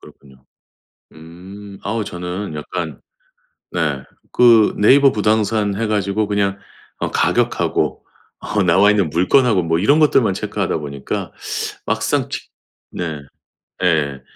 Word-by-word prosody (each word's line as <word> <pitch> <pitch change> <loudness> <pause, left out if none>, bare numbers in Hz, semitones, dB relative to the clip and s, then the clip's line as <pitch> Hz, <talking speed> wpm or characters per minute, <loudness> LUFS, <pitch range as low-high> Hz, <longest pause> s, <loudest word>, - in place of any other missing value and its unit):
그렇군요. 65 -2 -18 0.7
음. 95 +5 -12
어우 110 +1 -2
저는 90 0 -5
약간 80 0 -5 0.7
네 75 -6 -1 0.3
그 115 -3 +5
네이버 135 +6 +5
부동산 105 -1 +1
해 110 +2 -1
가지고 105 0 0
그냥 100 -1 -1 0.4
어 - - -2
가격하고 - - 0 0.3
어 100 -2 -1
나와있는 95 0 +3
물건하고 95 - +3
뭐 80 0 0
이런 140 - +3
것들만 130 -9 +3
체크하다 - - -2
보니까 70 -2 -5 0.5
막상 - - -1
직 - - -6 0.4
네. 80 -4 -4 0.6
예예예. 75 -6 +1
100 Hz, 245 characters per minute, -19 LUFS, 80-105 Hz, 0.7 s, 그